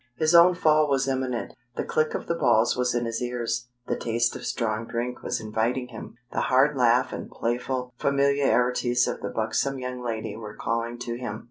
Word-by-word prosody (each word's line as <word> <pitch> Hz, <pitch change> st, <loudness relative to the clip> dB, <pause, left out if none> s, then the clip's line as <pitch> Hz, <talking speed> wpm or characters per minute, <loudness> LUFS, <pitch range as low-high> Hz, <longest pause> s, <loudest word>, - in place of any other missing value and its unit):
His 155 Hz, +5 st, +2 dB
own 175 Hz, +1 st, +8 dB
fall 155 Hz, -3 st, +3 dB
was 135 Hz, -1 st, +1 dB
imminent. 130 Hz, -2 st, -2 dB, 0.2 s
The -, -, -1 dB
click 155 Hz, 0 st, 0 dB
of -, -, -4 dB
the -, -, 0 dB
balls 115 Hz, -8 st, +3 dB
was 125 Hz, 0 st, 0 dB
in 120 Hz, 0 st, 0 dB
his 115 Hz, +1 st, -3 dB
ears, 120 Hz, -1 st, -2 dB, 0.2 s
the -, -, -1 dB
taste 120 Hz, +1 st, 0 dB
of -, -, -6 dB
strong 115 Hz, -1 st, -2 dB
drink 120 Hz, +1 st, -3 dB
was -, -, -2 dB
inviting 115 Hz, +4 st, -1 dB
him. 115 Hz, -1 st, -9 dB, 0.2 s
The -, -, -1 dB
hard 135 Hz, +3 st, +3 dB
laugh 125 Hz, -1 st, +3 dB
and -, -, -6 dB
playful 125 Hz, +1 st, -2 dB
familiarities 135 Hz, -3 st, +2 dB
of -, -, -3 dB
the 100 Hz, -, -3 dB
buxom 115 Hz, +6 st, -1 dB
young 125 Hz, -1 st, -5 dB
lady 110 Hz, -3 st, -3 dB
were 105 Hz, -1 st, -8 dB
calling 115 Hz, +1 st, -2 dB
to 120 Hz, 0 st, -4 dB
him. 110 Hz, -4 st, -4 dB
125 Hz, 195 wpm, -26 LUFS, 115-135 Hz, 0.2 s, own